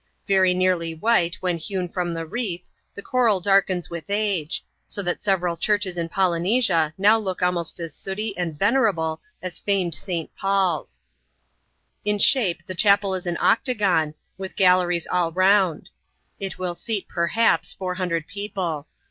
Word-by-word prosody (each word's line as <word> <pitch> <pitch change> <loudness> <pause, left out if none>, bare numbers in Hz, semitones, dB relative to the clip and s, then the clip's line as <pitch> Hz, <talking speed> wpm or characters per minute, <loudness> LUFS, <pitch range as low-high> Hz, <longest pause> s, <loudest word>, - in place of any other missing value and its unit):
Very 190 -2 +4
nearly 180 -3 +1
white 175 -2 +2
when 180 -2 0
hewn 185 +2 -3
iram 175 -2 -1
the 165 0 -4
reefs, 180 -2 -4 0.2
the 200 - -8
coral 235 -6 +2
darkens 185 -2 +2
with 170 -1 -6
age; 200 -6 -1 0.2
so 200 - -3
that 175 -1 -2
several 180 -4 +1
churdies 205 +1 0
in 170 -1 -3
Polynesia 180 -2 +2
mow 210 +3 +5
look 190 -4 -3
almost 175 -1 -1
as 165 -3 -5
sooty 200 +4 -4
and 170 -4 -3
venerable 200 - +1 0.2
as 185 -2 -5
famed 190 -4 0
St. 170 -1 -4
Paul's. 195 -2 -1 1.0
In 210 0 0
shape, 190 - +3
the 185 - -5
chapel 200 +1 +3
is 185 -1 -4
an 170 -1 -1
octagon, 195 - +2 0.2
with 190 -1 -6
galleries 180 -2 +3
all 175 -2 0
round. 185 -2 +2 0.5
It 195 -1 -4
will 180 -1 -3
seat, 210 +3 -3
perhaps, 185 +7 +1
four 185 -1 -4
hundred 175 -4 -2
people. 185 -7 -4
185 Hz, 150 wpm, -23 LUFS, 170-200 Hz, 1.0 s, mow